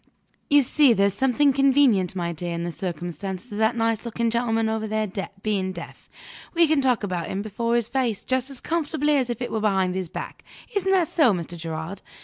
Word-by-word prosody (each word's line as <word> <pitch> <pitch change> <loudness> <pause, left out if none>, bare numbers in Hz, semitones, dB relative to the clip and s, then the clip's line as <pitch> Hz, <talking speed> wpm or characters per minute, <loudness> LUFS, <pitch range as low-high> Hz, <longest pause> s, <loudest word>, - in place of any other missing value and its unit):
"You 290 -1 +6
see 275 0 +4
there's 200 -2 +2
something 265 +5 +3
convenient, 260 -9 +3
my 170 -2 -2
dear, 170 +1 -4
in 170 - -3
the 175 - -3
circumstance 180 - -5
of 205 - -5
that 220 +2 +2
nice 225 -1 0
looking 235 -1 -1
gentleman 225 -1 +1
over 220 0 -2
there 215 -2 -1 0.3
being 195 -3 0
deaf. 170 -2 -10 0.5
We 335 0 +6
can 305 -2 +2
talk 250 -4 +2
about 180 -4 -2
him 195 +1 -3
before 230 +3 -1
his 235 -2 +1
face, 245 -6 -1
just 260 +1 0
as 270 -3 -6
comfortably 300 -2 0
as 260 -3 +1
if 240 +1 -3
it - - -4
was 220 - -1
behind 190 -3 +1
his 185 -2 -3
back. - - -7 0.3
Isn't 385 -1 +1
that 365 -4 +3
so, 285 -10 +3
Mr. 175 -1 -4
Gerard? 165 +3 -6
220 Hz, 205 wpm, -24 LUFS, 190-260 Hz, 0.5 s, You